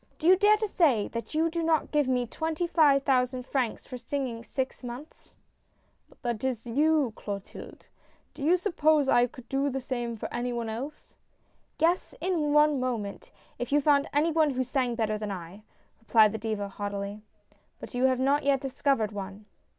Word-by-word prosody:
" - - -35
Do - - -7
you 365 +2 +8
dare 415 +2 +5
to 430 0 -1
say 285 - +2
that 230 +6 -6
you 320 +1 +3
do 335 0 -2
not 320 -2 +1
give 295 -3 +2
me 250 -1 +1
twenty 320 +7 -2
five 295 -5 +4
thousand 255 -1 +1
francs 255 -4 -2
for 250 - -8
singing 250 -4 -4
six 260 +1 -4
months? 245 +5 -10 0.3
" - - -42
" - - -43
But 240 -3 -2
that - - -16
is 250 -4 -1
to 240 - -7
you, 295 -2 +2
Clotilde! 200 -2 -8 0.5
Do - - -12
you 340 +5 +4
suppose 315 -6 +2
I 245 -2 +4
could 250 0 -14
do 275 +1 0
the 270 0 -3
same 240 -3 -4
for - - -4
any 245 +1 -2
one 235 -1 -3
else? 265 +7 -7 0.3
" - - -42
"Yes, 335 +4 +1
in 330 -5 0
one 300 -1 +4
moment, 230 -6 -4 0.3
if 245 - -4
you 290 - +4
found 285 -1 +3
any 300 +3 +2
one 315 -1 +3
who 260 -2 -1
sang 255 -1 -1
better 215 -2 -1
than 210 -1 -4
I," 185 +1 -7 0.4
replied 220 -2 +4
the 220 - -5
Diva, 210 -2 -3
haughtily. 200 +1 -5 0.3
" - - -36
But - - -8
3^ou 250 +1 +2
have 255 -1 +1
not 280 +3 +2
yet 275 -1 +2
discovered 270 -4 0
one." 200 0 -7
260 Hz, 205 wpm, -28 LUFS, 230-300 Hz, 0.5 s, you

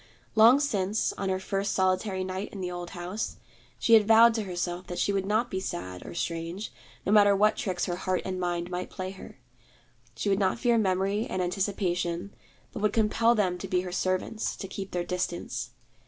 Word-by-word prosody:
Long 230 +5 +7
since, 210 -7 0
on 195 - -3
her 185 0 0
first 195 +1 -2
solitary 185 +1 +1
night 190 +2 -4
in 200 - -8
the 180 -1 -3
old 175 -1 -5
house, 180 +4 -4 0.4
she 230 - +2
had 215 -2 +7
vowed 225 +1 +7
to 220 -2 -2
herself 175 -1 -3
that 175 - -5
she 200 - +1
would 195 -1 -1
not 220 +4 +1
be 190 - -1
sad, 90 - -5
or - - -8
strange, 170 +4 -4 0.3
no - - +1
matter 205 -1 +6
what 210 +2 +4
tricks 180 -3 -2
her 175 -1 -3
heart 185 0 -1
and 185 -1 -3
mind 175 0 -2
might 180 0 -3
play 185 -1 -5
her. 190 - -12 0.8
She 115 - -3
would 195 0 +2
not 190 +1 +1
fear 235 -1 +3
memory 195 +2 +1
and 185 - -2
anticipation, 180 -1 -1 0.4
but 215 - -5
would 210 -1 +2
compel 225 +1 +3
them 185 -4 0
to - - -5
be 180 -1 +1
her 180 -1 -6
servants, 185 +4 -1
to 195 - -6
keep 195 0 -6
their 175 -1 -2
distance. 180 -1 -3
190 Hz, 200 wpm, -28 LUFS, 180-210 Hz, 0.8 s, Long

